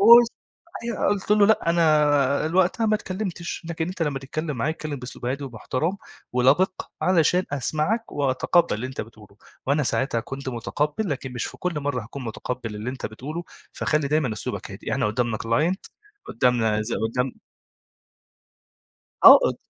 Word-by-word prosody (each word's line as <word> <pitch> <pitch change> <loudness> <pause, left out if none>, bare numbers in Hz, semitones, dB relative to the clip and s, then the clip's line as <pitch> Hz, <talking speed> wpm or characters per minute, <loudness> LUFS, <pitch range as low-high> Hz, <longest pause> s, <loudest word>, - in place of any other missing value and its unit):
قُلت 235 0 +10 0.6
أيوه. 235 -3 0
قُلت 205 -1 -1
له: 210 -1 +6
"لأ 210 -6 +3
أنا 150 -3 +3
ال 160 - -4
وقتها 185 +5 +3
ما 215 - +3
اتكلّمتش، 185 -4 -4
لكن 165 0 -2
أنت 185 -1 -3
لمّا 145 -4 -1
تتكلّم 150 +2 -4
معايا 140 +6 0
اتكلّم 155 -2 -5
بأسلوب 125 -1 -8
هادي 140 +3 -2
ومحترم 135 - -2 0.4
ولَبِق 140 +10 +2
علشان 180 0 +3
أسمعك، 155 - -1
وأتقبّل 145 +5 +2
اللي 110 +5 -3
أنت 130 - -5
بتقوله، 105 -2 -12 0.3
وأنا 145 +3 +2
ساعتها 130 -3 0
كنت 135 +3 -7
مُتقبّل 150 - -2
لكن 130 -2 -4
مش 120 - -3
في - - -9
كل 175 -4 -2
مرّة 140 -4 -2
هاكون 125 +5 -8
مُتقبّل 115 0 -5
اللي 110 +4 -4
أنت 130 - -5
بتقوله، 150 +10 -6 0.3
فخلّي 150 -2 0
دايمًا 150 -5 +1
أسلوبك 110 - -5
هادي. - - -6
إحنا - - +1
قُدّامنا 115 0 -1
client 150 +12 +1 0.5
قُدّامنا 115 -3 +2
زي 110 +2 -3
قُدّام" 125 +3 -1 1.9
آه. - - +12
أد - - -3
145 Hz, 160 wpm, -24 LUFS, 125-170 Hz, 1.9 s, آه